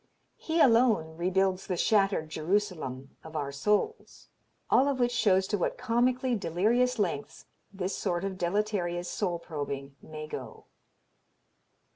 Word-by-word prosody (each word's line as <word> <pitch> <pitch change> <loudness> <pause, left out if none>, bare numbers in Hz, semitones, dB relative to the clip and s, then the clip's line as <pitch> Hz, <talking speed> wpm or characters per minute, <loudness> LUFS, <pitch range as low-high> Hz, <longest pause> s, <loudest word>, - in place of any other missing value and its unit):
He 325 +1 -1
alone 225 - +4
rebuilds 185 +2 0
the 180 - -1
shattered 195 -5 +2
Jerusalem 155 -6 -2
of 160 0 -11
our 145 -2 -2
souls." 210 - -1 0.4
All 270 - +5
of 275 -2 0
which 245 0 +2
shows 195 -6 +3
to 205 - 0
what - - -1
comically 250 +1 +1
delirious 220 +7 +1
lengths 170 -9 -3 0.3
this 190 -1 -3
sort 175 0 -1
of 195 -1 -3
deleterious 180 -1 -1
soul 175 -2 -1
probing 140 -4 -6
may 155 -1 -8
go. 155 - -8
190 Hz, 130 wpm, -29 LUFS, 160-225 Hz, 0.4 s, All